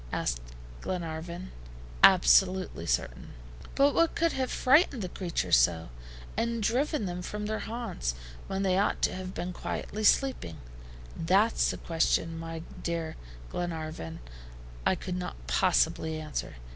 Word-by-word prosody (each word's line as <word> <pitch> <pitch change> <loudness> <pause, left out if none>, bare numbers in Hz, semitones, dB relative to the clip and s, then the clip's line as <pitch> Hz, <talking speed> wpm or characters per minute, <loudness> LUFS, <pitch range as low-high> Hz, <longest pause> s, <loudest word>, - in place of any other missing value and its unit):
asked - - -1 0.4
Glenarvan. 170 +1 -4 0.5
"Absolutely 185 - +5
certain." - - -2 0.4
"But 280 +1 +4
what 335 0 +3
could 335 0 +2
have 260 -1 -1
frightened 265 - +4
the 180 - -3
creatures 175 - +1
so, 80 +4 +2 0.5
and 230 0 -1
driven 255 +2 +1
them 180 -1 -4
from 210 +3 -4
their 215 +1 -2
haunts, 140 - -3 0.3
when 195 0 -2
they 190 -1 +2
ought 200 - 0
to - - +3
have 185 0 -6
been 180 +1 -3
quietly 215 +4 -4
sleeping?" 205 - +2 0.6
"That's 195 +7 +3
a - - -5
question, 165 0 +1
my 165 0 -6 0.2
dear 165 -2 -3 0.4
Glenarvan, 155 - -4 0.7
I - - +4
could 180 -1 -4
not 180 - -4
possibly 155 - +2
answer. 155 -2 -4
180 Hz, 130 wpm, -29 LUFS, 160-215 Hz, 0.7 s, Absolutely